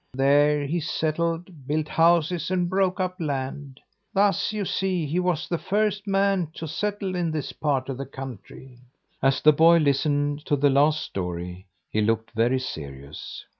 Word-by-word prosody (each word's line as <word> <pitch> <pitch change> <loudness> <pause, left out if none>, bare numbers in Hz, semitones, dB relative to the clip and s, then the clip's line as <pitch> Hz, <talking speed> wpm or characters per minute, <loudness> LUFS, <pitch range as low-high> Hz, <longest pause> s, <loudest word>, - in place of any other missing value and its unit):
There 145 +2 +3
he 165 +5 -1
settled, 165 -1 -2
built 155 +1 0
houses 170 0 +2
and 180 -1 +1
broke 190 +1 +1
up 185 0 -2
land. 140 -2 -4 0.4
Thus, 200 +1 +2
you 210 -2 -2
see, 185 -3 -1
he 160 +5 -1
was 180 -2 0
the 170 - -2
first 205 0 0
man 195 -3 +1
to 160 - -5
settle 200 +4 -2
in 175 -2 -1
this 155 -2 -4
part 140 -4 -1
of 135 -1 -5
the 140 - -5
country." 130 -1 -10 0.4
As 135 0 +2
the 155 - +7
boy 165 +3 +6
listened 145 0 +1
to 145 - +3
the 145 0 +3
last 150 +3 +3
story, 90 0 -5 0.2
he 110 - -1
looked 110 +1 0
very 120 +3 +2
serious. 70 - -7
150 Hz, 165 wpm, -25 LUFS, 135-180 Hz, 0.4 s, the